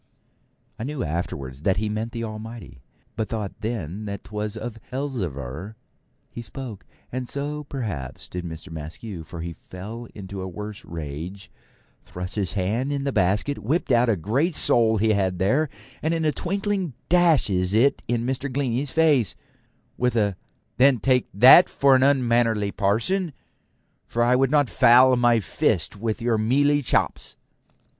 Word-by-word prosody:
I - - -4
knew 140 -1 -3
afterwards 70 -5 -4
that 95 +3 +1
he 105 +2 -1
meant 110 +2 -3
the 115 0 -4
Almighty, 110 - -8 0.3
but 110 - -2
thought 110 -2 -5
then 105 -3 -4
that 100 -1 -5
'twas 105 0 -4
of 115 0 -6
Elzevir 95 - -4 0.6
he 120 - -7
spoke; 115 -1 -8 0.2
and 125 0 -4
so, 145 +1 -3
perhaps, 105 - -5
did 90 0 -6
Mr. 85 +1 -8
Maskew, 80 +4 -7
for 80 +1 -8
he 85 0 -5
fell 105 +8 -9
into 95 -1 -7
a 95 - -4
worse 105 +3 -7
rage, 85 +4 -7 0.5
thrust 90 0 -7
his 100 -1 -2
hand 110 +8 -1
in 140 -1 -2
the 140 - -1
basket, 105 +7 +1
whipped 135 - -1
out 120 0 +4
a 110 - +3
great 130 - 0
sole 115 -5 +3
he 110 +2 +2
had 95 -3 +1
there, 130 - +2 0.3
and 160 +2 0
in 165 -1 -1
a 155 - +3
twinkling 195 -2 -2
dashes 135 - +3
it 135 +5 +3
in 120 -1 0
Mr. 130 +1 -2
Glennie's 130 0 -1
face, 145 - +3 0.6
with 125 -1 +1
a 105 -4 +1 0.4
'Then, 130 0 +5
take 125 +3 +1
that 130 - +8
for 140 -1 +4
an 130 - +3
unmannerly 120 -6 +2
parson, 140 - 0 0.7
for 120 - 0
I 125 +1 +4
would 135 0 +3
not 145 -1 +3
foul 125 +2 +6
my 120 -1 +4
fist 105 - 0
with 110 +2 -3
your 115 -2 +1
mealy 145 +6 +3
chops.' 130 - -1
115 Hz, 160 wpm, -24 LUFS, 100-135 Hz, 0.7 s, that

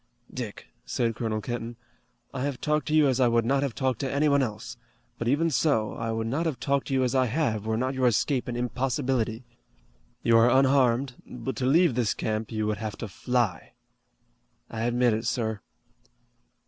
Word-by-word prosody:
"Dick," - - -6 0.2
said 115 -2 -1
Colonel 110 -2 -2
Kenton, 120 0 -5 0.6
"I 130 - -4
have 140 -1 -2
talked 150 0 0
to 155 - -1
you 155 -2 +5
as 130 -1 +1
I 125 - +5
would 115 -1 +2
not 135 +3 +2
have 140 -5 -2
talked 130 -2 -1
to 135 -3 -2
anyone 140 0 +3
else, 110 -3 -4 0.4
but 115 - -2
even 155 +6 +2
so, 130 -7 +1
I 115 0 -3
would 110 0 -2
not 145 +9 -1
have 150 -6 -3
talked 140 -1 0
to 135 - -3
you 130 - +2
as 125 - 0
I 130 -1 +3
have, 110 -5 -1
were 110 0 0
not 130 +3 -1
your 130 -1 +2
escape 125 +3 +1
an 120 - -3
impossibility. 125 -1 -1 0.8
You 115 0 +5
are 115 +2 +5
unharmed, 130 -1 +3
but 125 +2 -5
to 130 - 0
leave 165 +1 +4
this 120 -3 0
camp 110 0 -3
you 110 -1 -1
would 105 0 -1
have 110 0 -5
to 115 - -5
fly." 110 -3 -1 1.0
"I 115 0 -2
admit 120 -1 +2
it, 110 +1 -2
sir." 110 -4 -1
125 Hz, 195 wpm, -27 LUFS, 115-135 Hz, 1.0 s, you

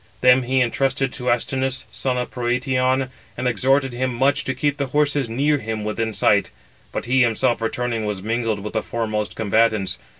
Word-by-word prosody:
Them 125 +1 +6
he 130 +1 +1
intrusted 135 +2 0
to 125 -1 -3
Astynous, 130 +2 0
son 130 -2 -2
of 125 - -3
Protiaon, 130 +1 0 0.3
and 125 +1 -1
exhorted 135 +3 +2
him 130 +1 -1
much 135 +4 +1
to 130 - -2
keep 145 +2 0
the 140 - -1
horses 145 -2 +1
near 145 +5 +1
him 110 -2 -4
within 110 +1 -2
sight; - - +3 0.4
but - - -4
he 130 +2 +3
himself 120 0 +2
returning 115 -1 -2
was 105 -2 -2
mingled 115 -1 -1
with 105 - -6
the 110 - 0
foremost 110 -2 -3
combatants. 110 -3 +1
125 Hz, 175 wpm, -22 LUFS, 115-130 Hz, 0.4 s, Them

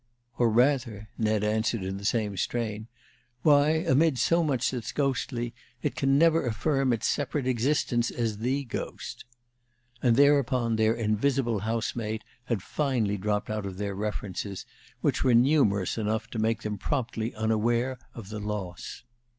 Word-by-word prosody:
"Or, 120 -2 +4
rather," 120 -3 +1
Ned 110 -1 +1
answered, 110 0 0
in 95 +1 -3
the 100 - -8
same 105 -2 0
strain, 110 +1 -2 0.6
"why, 145 -1 +5 0.2
amid 160 -2 +3
so 170 +6 +3
much 135 -5 +1
that's 125 -3 -4
ghostly, 125 -3 -1 0.3
it - - -1
can 135 0 +2
never 165 +1 +4
affirm 135 +3 +1
its 115 - 0
separate 145 -1 -1
existence 125 -1 +1
as 110 -3 -2
the 130 +5 0
ghost." 120 - -6 0.8
And 120 -3 +4
thereupon 130 -4 +3
their 110 +1 +3
invisible 115 +1 +1
housemate 110 0 -2 0.2
had 115 -7 -2
finally 120 -9 0
dropped 105 +2 -1
out 105 -2 -2
of 95 -1 -7
their 100 0 -3
references, 100 -1 -4 0.4
which - - +1
were 125 -3 +4
numerous 115 - +3
enough 110 +1 -1
to 115 - -3
make 115 +1 0
them 105 -2 -3
promptly 115 -3 -2
unaware 115 +3 0 0.2
of 110 -5 -9
the 105 0 -5
loss. 105 -4 -5
115 Hz, 150 wpm, -28 LUFS, 105-130 Hz, 0.8 s, why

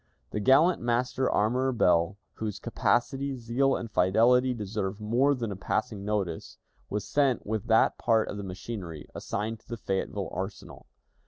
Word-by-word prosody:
The 105 - -2
gallant 140 - +4
Master 120 +2 0
Armorer 125 +5 +2
Ball, 90 -3 +2 0.2
whose 105 -2 -4
capacity, 135 +3 0
zeal, 125 +3 +1
and 115 -2 -5
fidelity 120 +8 +4
deserve 105 -3 -3
more 120 +7 +2
than 115 -4 -3
a - - -4
passing 105 +2 -2
notice, 100 -5 -3 0.3
was 105 -1 -3
sent 140 -5 +1
with 110 -1 -3
that 110 -1 +3
part 115 -2 +2
of 105 - -5
the 100 - -5
machinery 95 -4 -6
assigned 110 +2 -3
to - - -32
the 120 - -5
Fayetteville 95 -1 -2
Arsenal. 95 +2 -7
110 Hz, 155 wpm, -28 LUFS, 100-125 Hz, 0.3 s, gallant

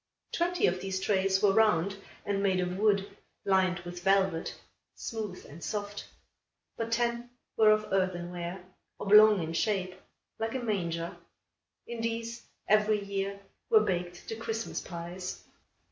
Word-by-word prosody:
Twenty 350 +1 +1
of 180 +1 +1
these 190 0 -2
trays 190 0 +1
were 205 - +6
round 200 -3 +3 0.3
and 200 -1 0
made 190 -2 +2
of 180 0 -1
wood, 200 -1 +1 0.3
lined 190 -2 +2
with 175 0 -8
velvet, 190 -3 +2 0.4
smooth 215 -5 -5
and 155 +4 -11
soft; 205 -1 -4 0.7
but 230 0 -3
ten 235 +1 0 0.3
were 220 -1 +6
of 215 0 +4
earthenware, 175 -1 -2 0.4
oblong 210 -2 +7
in 160 +1 -4
shape, 185 0 0 0.5
like 225 +2 -2
a - - 0
manger. 170 -8 -2 0.7
In 235 -1 -5
these, 230 +1 -3 0.3
every 215 0 +3
year, 200 0 -3 0.3
were 440 -2 +7
baked 175 -1 -2
the 225 - -4
Christmas 225 0 -3
pies. 175 +1 -6
195 Hz, 135 wpm, -30 LUFS, 180-220 Hz, 0.7 s, oblong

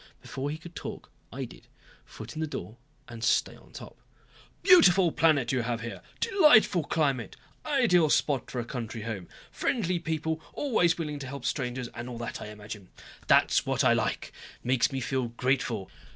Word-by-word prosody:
Before 135 +2 -5
he 155 - -4
could 170 +1 -12
talk - - -7 0.2
I - - -4
did, - - -15 0.4
foot 110 +4 -10
in 155 - -6
the 160 - -1
door 110 - -7 0.3
and 115 -3 -9
stay - - +2
on - - -19
top. - - -11 0.6
"Beautiful 195 - +7
planet 150 -8 +3
you 130 -2 +1
have 115 0 -2
here. 115 0 -6 0.2
Delightful 300 - +5
climate! 140 -8 0 0.3
Ideal 225 - +4
spot 140 -3 +1
for 125 - -4
a 120 - -3
country 115 -2 -5
home. 105 -6 -5 0.2
Friendly 185 -8 0
people, 160 -1 -2
always 220 - +2
willing 150 -3 -4
to 135 - -6
help 140 -1 -7
strangers 125 -2 -2
and 120 +3 -7
all 120 - -6
that 120 0 -5
I - - -6
imagine. 105 -2 -9 0.4
That's - - +4
what - - +1
I - - +5
like. - - -2 0.3
Makes 125 +2 +2
me 135 -1 -3
feel 130 0 -1
grateful. 120 -4 -1
135 Hz, 175 wpm, -28 LUFS, 120-165 Hz, 0.6 s, Beautiful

